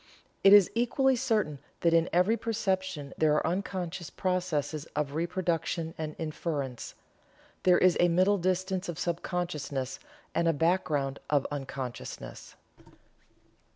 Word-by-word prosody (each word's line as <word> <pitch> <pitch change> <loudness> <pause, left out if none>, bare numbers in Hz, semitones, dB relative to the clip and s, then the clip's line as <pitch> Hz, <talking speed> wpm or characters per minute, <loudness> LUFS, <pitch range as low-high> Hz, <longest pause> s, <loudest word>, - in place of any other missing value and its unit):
It 195 - +8
is 205 -2 +8
equally 255 +3 +2
certain 220 - 0 0.2
that 170 -1 +3
in 165 0 +3
every 180 +6 +3
perception 190 -10 -2
there 155 -1 +4
are - - +1
unconscious 180 -2 -3
processes 165 -5 -1
of 145 -1 -1
reproduction 165 -1 -1
and 155 -1 -5
inference. 150 -5 -4 0.7
There 180 -1 +5
is 185 -1 +4
a 175 - +5
middle 185 +4 +3
distance 185 +1 -1
of 170 - -4
sub 170 -1 -2
consciousness, 150 -7 -3 0.3
and 170 - +1
a 165 - +4
background 145 -4 0
of 145 -2 +2
unconsciousness." 135 -3 -6
170 Hz, 125 wpm, -29 LUFS, 150-185 Hz, 0.7 s, It